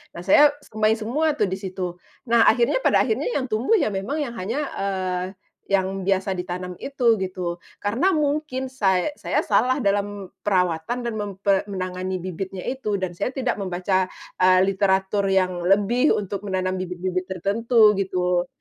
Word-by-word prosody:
nah 170 - -7
saya 290 +9 +6
semai 215 0 +1
semua 285 +8 0
tuh 210 -8 +1
disitu. 185 -2 -4 0.3
Nah 235 -1 +5
akhirnya 235 - +3
pada - - +3
akhirnya 440 - -1
yang 260 -3 -2
tumbuh 230 - +2
ya 290 - +1
memang 240 +11 -2
yang 255 - -5
hanya, 215 +8 -3 0.2
eee, 185 -2 -1 0.4
yang 195 -1 0
biasa 195 0 +1
ditanam 180 0 -5
itu 245 -6 +1
gitu. 180 -2 -3 0.2
Karena 250 - +2
mungkin 290 -3 -1
say 195 -1 +1
saya - - 0
salah 255 +1 +2
dalam 200 -1 -1
perawatan 180 +4 0
dan 235 -1 -2
mempe 200 -1 0
menangani 185 -1 -3
bibitnya 185 +1 -5
itu 250 -6 -2
dan 185 -2 -2
saya 245 +9 -4
tidak 255 -5 -1
membaca, 185 0 0 0.3
eee, 185 0 +5
literatur 195 0 +1
yang 190 -1 +2 0.2
lebih 205 +8 +3
untuk 200 0 -4
menanam 185 -1 -1
bibit-bibit 185 0 -3
tertentu 210 +4 +3
gitu. 180 -2 0
195 Hz, 150 wpm, -23 LUFS, 185-235 Hz, 0.4 s, saya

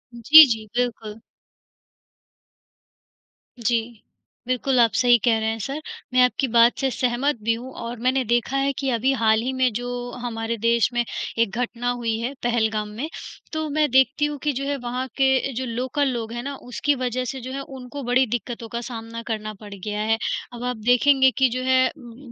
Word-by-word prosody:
जी, 300 +7 +9
जी 220 -1 -8
बिल्कुल। 225 -3 -3 2.4
जी। 235 +1 +2 0.7
बिल्कुल, 255 +1 +1
आप 230 -2 +5
सही 245 -1 +6
कह 230 -2 +4
रहे 220 0 -1
हैं 225 - -2
सर 275 +8 -4 0.3
मैं 255 - +5
आपकी 255 +2 +1
बात 235 +1 +5
से 270 -1 +1
सहमत 255 +3 0
भी 230 +1 +2
हूँ 250 +3 -7
और 235 0 -6
मैंने 255 +2 +1
देखा 240 +4 0
है 275 +1 +1
कि 270 -1 -1
अभी 245 +3 +1
हाल 220 -3 +2
ही 255 +3 -2
में 260 -2 +2
जो 245 +2 -4 0.3
हमारे 230 -1 -3
देश 230 0 +2
में 240 0 +1 0.4
एक 230 - +3
घटना 245 0 -2
हुई 235 -2 -1
है, 245 +4 -3
पहलगाम 220 -3 0
में, 250 +10 -5 0.4
तो 315 0 -2
मैं 300 0 +1
देखती 265 +3 +3
हूँ 295 -1 -3
कि 295 - +1
जो 270 +2 -3
है 285 - 0
वहाँ 250 +2 -3
के 265 0 +2
जो 260 +2 -3
लोकल 255 +4 -1
लोग 235 -3 -3
हैं 240 0 -5
ना, 280 0 -5
उसकी 275 +4 -1
वजह 255 0 -2
से 265 +1 -5
जो 255 +2 -7
है 275 - -4 0.2
उनको 255 +3 -8
बड़ी 250 +2 +3
दिक्कतों 235 0 -4
का 235 +1 -4
सामना 230 0 -7
करना 215 -1 -3
पड़ 205 -2 -10
गया 210 +2 -4
है। 225 +1 +1 0.4
अब 240 0 -7
आप 250 -2 -2
देखेंगे 265 +2 +5
कि 265 -2 +4
जो 255 +2 -3
है, 260 0 +4
उम 240 -1 -12
उम, 245 +1 -13
245 Hz, 195 wpm, -23 LUFS, 230-265 Hz, 2.4 s, जी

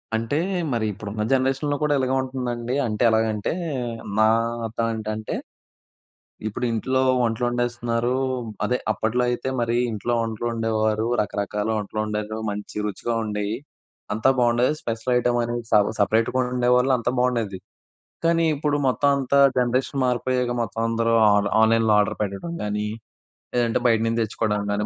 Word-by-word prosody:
అంటే 115 +7 -1 0.3
మరి 115 -2 0
ఇప్పుడున్న 105 +2 -6
జనరేషన్‌లో 135 +2 +1
కూడా 150 -1 +2
ఇలాగే 130 -1 0
ఉంటుందండి? 125 -2 -3
అంటే 110 +1 -1
ఎలాగంటే, 110 0 +1 0.7
నా 110 - +6 0.4
అర్థం 115 +1 -2
ఏంటంటే 110 0 -4 1.1
ఇప్పుడు 115 +4 -3
ఇంట్లో 130 +4 0 0.2
వంటలోండేస్తున్నారు 120 0 0 0.5
అదే 125 - +1
అప్పట్లో 115 +3 0
అయితే 120 +2 -2
మరి 115 0 0 0.2
ఇంట్లో 115 +3 -2
వంటలోండేవారు, 110 -1 -1 0.2
రకరకాల 105 0 -2
వంటలోండేరు 105 +1 -3
మంచి 105 0 -7
రుచిగా 105 +3 -3
ఉండేయి. 105 0 -2 0.6
అంతా 110 +5 +2
బావుండేది 120 +3 +3
స్పెషల్ 115 +2 -2
ఐటెమ్ 120 0 +1
అనేది 120 0 -3
స - - +5 0.2
సపరేట్‌గా 110 +4 +2
వండేవాళ్ళు 125 +1 +2
అంతా 120 0 -1
బావుండేది. 115 -7 0 0.7
కానీ 165 0 +3
ఇప్పుడు 145 0 0
మొత్తం 140 +3 +2
అంతా 140 +1 +1 0.2
జనరేషన్ 130 +2 0
మారిపోయాక 125 0 0
మొత్తం 115 0 -4
అందరూ 115 0 +1 0.2
ఆన్ 100 0 +2
-ఆన్‌లైన్‌లో 110 0 +4
ఆర్డర్ 105 - +1
పెట్టడం 105 - -4
గానీ, 105 0 -2 0.7
లేదంటే 120 -1 +2
బయటనించి 115 0 +2
తెచ్చుకోవడం 105 -1 -1
గానీ 105 +1 -1
115 Hz, 130 wpm, -23 LUFS, 110-125 Hz, 1.1 s, నా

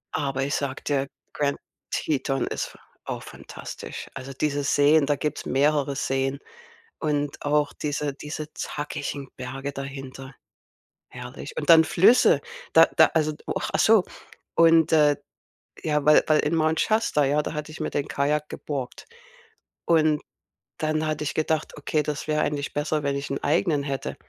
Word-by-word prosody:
Aber 135 -2 -1
ich 140 +1 -2
sage 140 -2 -3
dir, 140 -2 0 0.3
Grand 140 -1 0 0.3
Teton 135 -2 -1
ist - - -3
f - - -15 0.3
au - - -4
fantastisch. - - -9
Also 135 +1 -7
diese 145 +1 -1
Seen, 145 +1 +4
da 145 - +2
gibt's 150 +1 -3
mehrere 140 +1 +1
Seen 135 0 -1 0.6
und 145 -2 -1
auch 145 0 +2
diese 145 -1 -2
diese 150 +2 -7
zackigen 145 -2 -5
Berge 135 +2 -5
dahinter. 135 -1 -8 0.8
Herrlich. - - -9
Und - - -3
dann 160 -1 +8
Flüsse, 230 +8 +5 0.3
da - - +9
da, - - +9
also 155 -1 +1
oh, - - -1
ach - - -2
so, 220 -3 +6 0.5
und, 165 -1 +5
äh, 150 -2 +5 0.7
ja, 150 -2 +1
weil 150 - +7
weil 155 -1 +4
in 150 - 0
Mount 160 0 +2
Shasta, 215 -9 +2
ja, 145 +2 +2
da - - -4
hatte 150 0 -5
ich 155 - -10
mir 155 - -2
den 145 - -2
Kajak 150 +2 0
geborgt. 135 -4 -5 0.8
Und 155 -2 +3 0.6
dann 155 0 0
hatte 155 -1 -2
ich - - -2
gedacht: 155 0 -1
„Okay, 150 +1 0
das 150 0 -4
wäre 150 0 +1
eigentlich 145 -1 -2
besser, 150 +1 -1
wenn 140 -1 0
ich 140 - -5
'n 140 - -4
eigenen 150 -1 +2
hätte.“ 140 -1 -4
150 Hz, 160 wpm, -25 LUFS, 140-155 Hz, 0.8 s, da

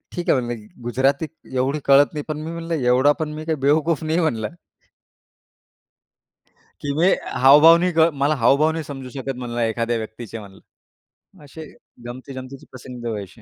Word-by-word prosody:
ठीक 175 - -4
आहे 130 - +4
म्हणले 120 -1 -4 0.3
गुजराती 135 +5 0 0.3
एवढी 135 +4 0
कळत 140 +2 +5
नाही. 150 -1 -4
पण 155 -1 -4
मी 160 +1 -6
म्हणलं 170 0 -5
एवढा 130 +1 +3
पण 155 - -2
मी 155 +1 -7
काही 160 -1 0
बेवकूफ 160 +1 +1
नाही 160 +2 0
म्हणलं. 115 -10 -1 2.3
की 145 - -3
मी 175 +3 +3 0.4
हावभाव 150 +5 +8
नाही 180 +1 0
का, 165 +1 +4
मला 140 +2 +1
हावभाव 140 +6 +4
नाही 160 -1 -4
समजू 135 -3 -8
शकत 135 0 -5
म्हणलं 120 -1 -5
एखाद्या 115 +1 -1
व्यक्तीचे 110 0 -7
म्हणलं. 100 -2 -13 0.8
असे, 155 +2 -10 0.4
गमतीजमतीचे 130 +1 -9
प्रसंग 125 -1 -10
व्हायचे. 105 +1 -7
135 Hz, 155 wpm, -21 LUFS, 120-155 Hz, 2.3 s, हावभाव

